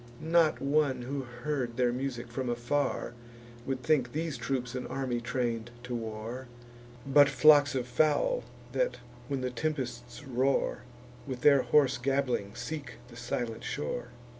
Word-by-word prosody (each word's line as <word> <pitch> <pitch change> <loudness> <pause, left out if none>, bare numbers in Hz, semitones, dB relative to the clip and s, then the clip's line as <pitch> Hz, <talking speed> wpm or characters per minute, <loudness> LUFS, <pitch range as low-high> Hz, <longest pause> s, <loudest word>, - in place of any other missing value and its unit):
Not 165 -2 +5
one 140 -2 +1
who 135 +3 -3
heard 125 0 -3
their 125 -1 +2
music 125 -2 -4
from 130 0 -2
afar, 120 +1 -1 0.5
Would 130 -1 -2
think 130 -6 +2
these 160 -1 -2
troops 125 0 -2
an 125 -1 -4
army 130 -3 -2
train'd 120 -2 -2
to 125 0 -5
war, 115 +2 -5 0.6
But 140 +1 +6
flocks 145 0 +6
of 125 -2 0
fowl, 155 - +2 0.3
that, - - 0 0.3
when 140 -2 -2
the 125 0 -2
tempests 135 0 -4
roar, 135 0 +1 0.5
With 130 -2 -5
their 140 -1 +6
hoarse 140 -4 +3
gabbling 125 -5 0
seek 140 +4 -5 0.2
the 120 - -13
silent 120 -1 -3
shore. 120 +11 -3
130 Hz, 140 wpm, -30 LUFS, 120-145 Hz, 0.6 s, But